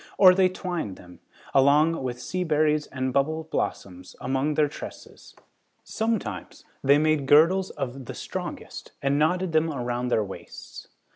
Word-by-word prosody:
Or, 185 Hz, -2 st, +8 dB
they 185 Hz, 0 st, +3 dB
twined 175 Hz, -, -4 dB
them, 90 Hz, -1 st, -15 dB, 0.3 s
along 150 Hz, +4 st, +4 dB
with 125 Hz, -2 st, -4 dB
sea 180 Hz, +8 st, -3 dB
berries 150 Hz, -2 st, +1 dB
and 130 Hz, -1 st, -3 dB
bubble 155 Hz, +4 st, 0 dB
blossoms, 90 Hz, -1 st, -4 dB
among 135 Hz, +3 st, -1 dB
their 150 Hz, 0 st, +3 dB
tresses. 145 Hz, -, -11 dB, 0.5 s
Sometimes 220 Hz, -, -3 dB, 0.2 s
they 140 Hz, +1 st, +5 dB
made 155 Hz, -2 st, +1 dB
girdles 170 Hz, +6 st, +5 dB
of 135 Hz, 0 st, -6 dB
the -, -, -7 dB
strongest -, -, -7 dB
and 140 Hz, +1 st, +2 dB
knotted 180 Hz, +3 st, +1 dB
them 160 Hz, 0 st, +2 dB
around 125 Hz, -2 st, -3 dB
their 110 Hz, -3 st, +1 dB
waists. 95 Hz, -, -10 dB
145 Hz, 145 wpm, -25 LUFS, 130-165 Hz, 0.5 s, Or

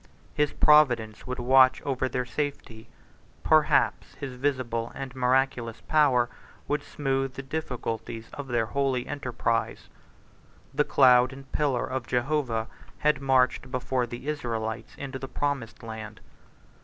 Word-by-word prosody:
His 150 Hz, -1 st, +1 dB
providence 125 Hz, -9 st, +3 dB
would 125 Hz, -, -3 dB
watch 130 Hz, +1 st, +5 dB
over 130 Hz, -1 st, -1 dB
their 125 Hz, 0 st, -2 dB
safety; 125 Hz, -6 st, -5 dB, 0.6 s
perhaps -, -, +3 dB
his 135 Hz, -2 st, -6 dB
visible 125 Hz, -3 st, -2 dB
and 135 Hz, -1 st, -6 dB
miraculous 125 Hz, -2 st, +1 dB
power 140 Hz, -6 st, +3 dB, 0.4 s
would 145 Hz, 0 st, 0 dB
smooth 135 Hz, -2 st, -2 dB
the 135 Hz, -, -6 dB
difficulties 120 Hz, -5 st, -4 dB
of 145 Hz, -1 st, -6 dB
their 120 Hz, -3 st, +1 dB
holy 135 Hz, 0 st, 0 dB
enterprise. 125 Hz, -5 st, -2 dB, 0.8 s
The 150 Hz, +2 st, +2 dB
cloud 125 Hz, -2 st, +5 dB
and 135 Hz, 0 st, -12 dB
pillar 140 Hz, -5 st, 0 dB
of 130 Hz, -2 st, -4 dB
Jehovah 125 Hz, -3 st, 0 dB, 0.3 s
had 150 Hz, -2 st, +1 dB
marched 130 Hz, -1 st, +2 dB
before 125 Hz, -1 st, -1 dB
the 120 Hz, +3 st, -8 dB
Israelites 115 Hz, -5 st, -3 dB
into 135 Hz, -1 st, -6 dB
the 135 Hz, -, -6 dB
promised 140 Hz, -6 st, -3 dB
land. 110 Hz, -1 st, -7 dB
130 Hz, 130 wpm, -27 LUFS, 120-140 Hz, 0.8 s, watch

